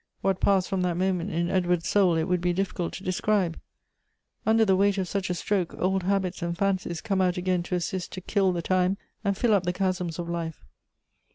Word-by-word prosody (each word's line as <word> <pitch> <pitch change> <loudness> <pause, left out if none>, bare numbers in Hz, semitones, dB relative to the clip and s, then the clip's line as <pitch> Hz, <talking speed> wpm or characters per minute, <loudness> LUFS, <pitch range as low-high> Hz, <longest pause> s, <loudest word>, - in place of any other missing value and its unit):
"What 195 -1 +1
passed 195 -2 +3
from 190 -3 -1
that 180 -2 0
moment 185 0 0
in 170 -1 -1
Edward's 180 -2 +1
soul 190 -5 +4
it 160 - +1
would 180 +1 0
be 175 0 +1
difficult 185 -2 -2
to 195 - -7
describe! 185 -2 0 0.9
Under 220 0 +5
the 190 -2 +4
weight 200 +1 +3
of 190 -2 -1
such 195 0 -2
a 180 - 0
stroke, 185 -1 -1
old 190 +1 +1
habits 190 -1 -1
and 170 0 -2
fancies 190 -4 -1
come 195 -3 0
out 180 -1 +1
again 180 0 0
to 180 +1 -3
assist 180 +1 -3
to 185 - -6
kill 195 0 +1
the 170 -2 -3
time 185 +2 +2 0.3
and 200 -2 0
fill 230 0 +3
up 200 - +4
the 180 0 -1
chasms 180 -3 -1
of 175 -1 -4
life. 170 -2 -4
185 Hz, 215 wpm, -26 LUFS, 175-195 Hz, 0.9 s, Under